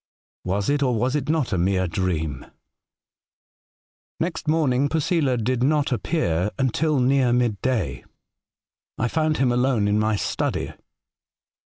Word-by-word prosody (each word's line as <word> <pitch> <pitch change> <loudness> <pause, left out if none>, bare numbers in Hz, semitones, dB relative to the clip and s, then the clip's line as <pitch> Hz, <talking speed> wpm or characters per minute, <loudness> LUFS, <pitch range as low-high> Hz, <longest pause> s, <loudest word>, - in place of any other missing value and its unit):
Was 95 +2 -1
it, 145 0 +1
or 125 -3 +2
was 125 +5 0
it 145 -1 -2
not, 155 -8 0
a 90 - +1
mere 95 +1 +1
dream? 80 -5 -2 0.8
'' - - -80 0.7
Next 165 -2 -3
morning 145 -4 +2
Posela 155 -4 +1
did 120 +2 -1
not 145 +2 +2
reappear 100 - 0
until 140 +3 +1
near 130 0 +3
midday. 120 - 0 0.9
I 120 - 0
found 155 +3 0
him 130 -2 +2
alone 120 -4 +1
in 105 +1 +2
my 110 0 +1
study. - - -2
125 Hz, 135 wpm, -23 LUFS, 105-145 Hz, 0.9 s, near